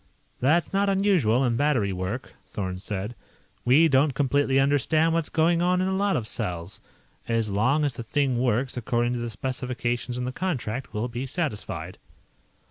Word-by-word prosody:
"That's 155 +7 +2
not 200 +1 +2
unusual 180 - +3
in 120 -2 +1
battery 125 -9 +1
work," 95 +7 -4
Thorn 95 -2 -5
said. 100 +3 -4 0.5
"We 145 +7 +5
don't 140 -1 +3
completely 140 -1 +2
understand 150 +4 +2
what's 165 -2 0
going 165 +1 +2
on 180 +1 +2
in 185 - +1
a 190 - 0
lot 200 0 +1
of 110 - -2
cells. 90 -5 -4 0.5
As 115 -2 0
long 125 +10 +2
as 140 - 0
the 120 -1 -6
thing 130 +1 0
works 125 +1 +1
according 120 0 0
to 120 - -2
the 120 0 -3
specifications 125 +1 -3
in 125 - -2
the 125 - -2
contract, 130 -8 -3
we'll 105 +3 -2
be 125 +2 -5
satisfied." 140 - -4
130 Hz, 170 wpm, -26 LUFS, 115-155 Hz, 0.5 s, We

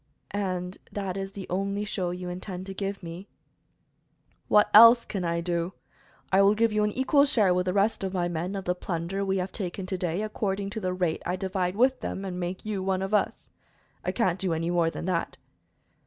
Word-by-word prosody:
"And 185 -2 -3
that 195 -3 -3
is 195 0 -4
the 195 -2 -6
only 200 +3 -1
show 185 -4 -2
you 180 0 -5
intend 180 +1 -6
to 195 - -6
give 195 0 -4
me?" 170 +4 -8 1.2
"What 210 0 +5
else 230 +2 +9
can 195 -3 -4
I 170 0 0
do? 170 +1 -1 0.6
I 190 +1 +5
will 200 +1 +5
give 225 0 +2
you 210 0 +2
an 210 - +2
equal 275 +2 +4
share 220 -10 +3
with 180 0 0
the 180 - +1
rest 200 +1 +1
of 190 - -1
my 180 -2 0
men 175 +3 -3
of 195 - -4
the 180 - +1
plunder 180 +2 -3
we 195 0 0
have 185 +1 -2
taken 190 -2 -4
to 185 0 -3
day, 180 +3 -1
according 200 -2 -2
to 220 - -4
the 185 -3 -1
rate 180 -3 -1
I 180 - -1
divide 185 -1 -2
with 255 +4 +3
them, 195 - -4
and 180 -1 -4
make 180 +3 -4
you 210 -3 -2
one 190 0 0
of 195 +2 -4
us. 210 - 0 0.5
I - - 0
can't 190 -6 0
do 180 -4 0
any 165 +2 -1
more 170 -2 +2
than 165 - -6
that." 180 -2 -1
190 Hz, 215 wpm, -27 LUFS, 180-200 Hz, 1.2 s, else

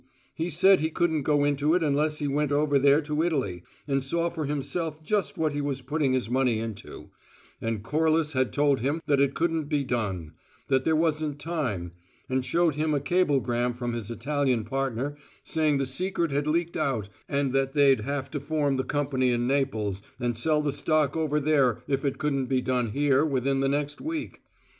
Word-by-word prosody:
He 165 +2 -3
said 185 +4 +5
he 160 - 0
couldn't 160 -2 0
go 145 +1 +2
into 145 +2 +2
it 180 - +1
unless 150 +1 +1
he 145 - -1
went 145 +1 0
over 145 -1 +2
there 140 +2 +5
to 150 0 -1
Italy 130 - -1 0.3
and 135 -2 0
saw 170 +5 0
for 160 -3 -3
himself 150 +3 -3
just 205 +4 -1
what 155 -2 0
he 145 - -2
was 140 -2 -3
putting 145 -3 0
his 130 -3 0
money 125 -1 +1
into, 110 -2 -7 0.5
and 115 -2 -2
Corliss 155 +3 +1
had 130 -1 +1
told 145 -2 +2
him 145 +7 -1
that 140 -2 +2
it 140 0 +1
couldn't 165 -2 0
be 145 -1 0
done; 100 - -3 0.4
that 130 -1 +2
there 160 - +3
wasn't 155 -2 0
time, 130 - -3 0.4
and 130 0 0
showed 170 +3 +2
him 155 +1 0
a - - +1
cablegram 135 -7 +1
from 120 -1 -3
his 115 -3 -4
Italian 130 0 0
partner 135 +2 -2 0.3
saying 155 -3 +1
the 135 - 0
secret 170 +4 -1
had 145 +1 -1
leaked 170 +2 0
out 135 -9 -1 0.2
and 140 -2 0
that 135 0 +1
they'd 140 -5 +4
have 135 +2 -3
to 145 - -3
form 145 -1 0
the 130 - 0
company 135 -3 0
in 120 0 0
Naples 110 -8 0 0.2
and 120 -2 -1
sell 150 +5 +1
the 145 -2 0
stock 150 -1 +1
over 155 -2 0
there 140 -6 +2
if 135 +1 -1
it 140 -2 -1
couldn't 140 -3 -1
be 130 0 +1
done 125 -2 0
here 140 +3 +2
within 135 -2 0
the 135 0 +1
next 145 +1 -2
week. 315 0 -5
145 Hz, 195 wpm, -27 LUFS, 130-155 Hz, 0.5 s, said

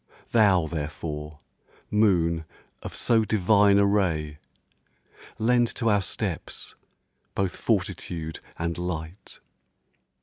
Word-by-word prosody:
Thou, 100 -7 +4
therefore, 75 -1 -5 0.5
moon 85 -6 +2 0.4
of - - -7
so 115 -2 +3
divine 100 -1 +4
a 100 - +5
ray, 80 -7 0 1.0
Lend 120 +2 +3
to 115 - +1
our 100 -1 +3
steps - - -4 0.6
both 95 -2 0
fortitude 80 -2 -2 0.2
and 85 +1 -2
light! 90 +1 -5
90 Hz, 95 wpm, -26 LUFS, 80-105 Hz, 1.0 s, a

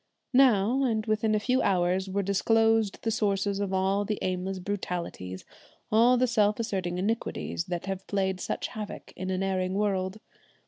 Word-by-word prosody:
Now, 250 -1 +4
and 220 -4 0
within 215 0 +1
a - - +2
few 250 +4 +1
hours, 185 0 +1
were 200 +1 -1
disclosed 225 +2 +2
the 225 - 0
sources 200 -2 0
of 200 -1 -2
all 190 +1 +1
the 210 0 -2
aimless 185 +1 -2
brutalities, 180 - -4 0.5
all 235 +3 +5
the 255 - +3
self 215 -3 +2
asserting 190 -6 -2
iniquities 200 -4 -2
that 175 -1 -4
have 195 0 -5
played 190 -2 -1
such - - -3
havoc 210 -2 -7
in 185 +1 -5
an 190 0 -1
erring 185 -1 -1
world. 195 -1 -1
200 Hz, 165 wpm, -28 LUFS, 185-220 Hz, 0.5 s, all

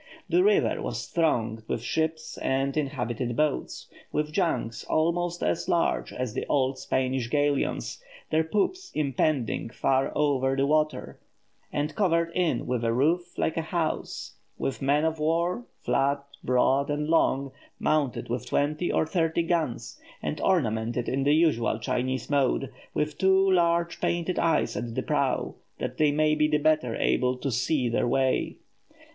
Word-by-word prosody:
The 360 +1 +3
river 410 0 +3
was - - -4
thronged 115 -10 0
with 115 - -2
ships 160 +3 -2
and 135 +1 0
inhabited 125 -4 -2
boats 150 +1 -1 0.3
with 150 0 -1
junks 155 - -1
almost 175 +2 0
as 85 - -1
large - - +1
as 125 -3 -4
the - - -2
old 130 -2 +1
Spanish 130 -2 -1
galleons, 145 - 0 0.3
their 160 0 +3
poops 360 - -1
impending 140 -4 0
far 130 +2 +1
over 135 -3 +2
the 135 0 +2
water, 155 +1 0 0.5
and 150 +1 -2
covered 170 -3 +1
in 170 -9 0
with 125 -2 -1
a 115 - +2
roof, 170 +8 +1
like 160 - 0
a - - +2
house; 165 0 -3 0.2
with 135 - -3
men 145 +3 +2
of 160 -1 -1
war, 170 +8 0 0.2
flat, 140 +1 +1 0.2
broad, 130 +3 +2
and 150 +1 -1
long, 140 -4 +2 0.3
mounted 150 -4 0
with 120 0 -3
twenty 150 +4 0
or - - +2
thirty 165 0 0
guns, 155 -9 -2 0.2
and 150 - -4
ornamented 120 - 0
in 135 +1 0
the 145 +1 +4
usual 150 -9 +2
Chinese 125 +3 -2
mode, 140 - +1 0.2
with 150 -1 -1
two 190 0 +4
large 170 -1 +2
painted 175 +1 0
eyes 165 -1 +1
at 120 -1 -4
the - - -1
prow, - - 0 0.2
that - - -4
they 150 -1 +4
may 155 +1 +2
be 150 0 +3
the 150 0 +2
better 150 -6 +1
able 125 0 +1
to 135 +1 -3
see 130 +2 +1
their 120 +1 +1
way. 130 +1 +1
145 Hz, 155 wpm, -27 LUFS, 130-165 Hz, 0.5 s, the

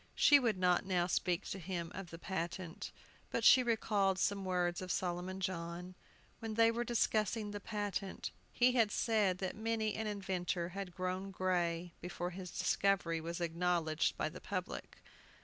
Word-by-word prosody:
She 290 -1 +7
would 230 -6 +1
not 180 -1 +3
now 180 -2 +1
speak 175 -1 0
to 195 - -4
him 170 -1 -4
of 190 -2 -6
the 165 - -8
patent; 170 -1 -4 0.4
but - - -1
she 260 - +9
recalled 210 -5 +2
some 200 +1 +1
words 180 -1 0
of 185 -1 -3
Solomon 180 +1 -2
John. 180 -1 -4 0.5
When 225 -1 -4
they 230 0 +6
were 235 +1 -1
discussing 220 -2 +1
the 205 - -4
patent 205 -2 -3 0.2
he 250 +1 +4
had 230 -4 +3
said 210 -6 +2
that 190 0 -3
many 220 -1 0
an 220 0 -2
inventor 185 -4 -2
had 190 -1 -6
grown 185 +1 -2
gray 175 -2 0
before 180 0 -4
his 180 0 -7
discovery 180 -2 +1
was 170 +2 -4
acknowledged 170 -2 +1
by - - 0
the - - -8
public. - - -5
185 Hz, 165 wpm, -35 LUFS, 175-210 Hz, 0.5 s, she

